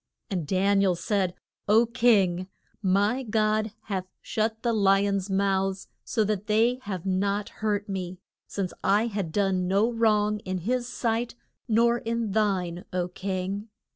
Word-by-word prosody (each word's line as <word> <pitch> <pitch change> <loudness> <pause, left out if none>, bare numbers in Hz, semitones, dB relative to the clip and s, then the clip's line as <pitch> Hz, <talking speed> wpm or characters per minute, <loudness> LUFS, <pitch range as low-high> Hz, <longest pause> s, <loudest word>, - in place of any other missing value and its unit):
And 175 -6 -2
Dan 195 +3 +2
i - - +3
el 185 -2 +3
said, 185 0 -1 0.3
O 220 +3 +5
king, 205 -7 +3 0.3
my 205 +6 +2
God 215 -2 +1
hath 190 -3 -3
shut 220 +1 -2
the 235 -1 +1
li 200 -1 +4
ons' 200 -1 -1
mouths 195 0 0
so 220 - 0
that 210 -1 -2
they 230 +4 +3
have 190 -4 -4
not 200 +2 0
hurt 205 -2 -2
me, 185 -2 -4 0.3
since 190 -3 -3
I 210 +3 +3
had 200 -7 -3
done 190 -1 +1
no 200 +5 +2
wrong 210 -2 +2
in 185 -2 -4
his 240 +7 -1
sight 235 -1 -1 0.3
nor 235 +1 +3
in 230 -2 -2
thine, 190 -5 0
O 180 -1 -1
king. 195 +3 -4
200 Hz, 155 wpm, -27 LUFS, 190-220 Hz, 0.3 s, O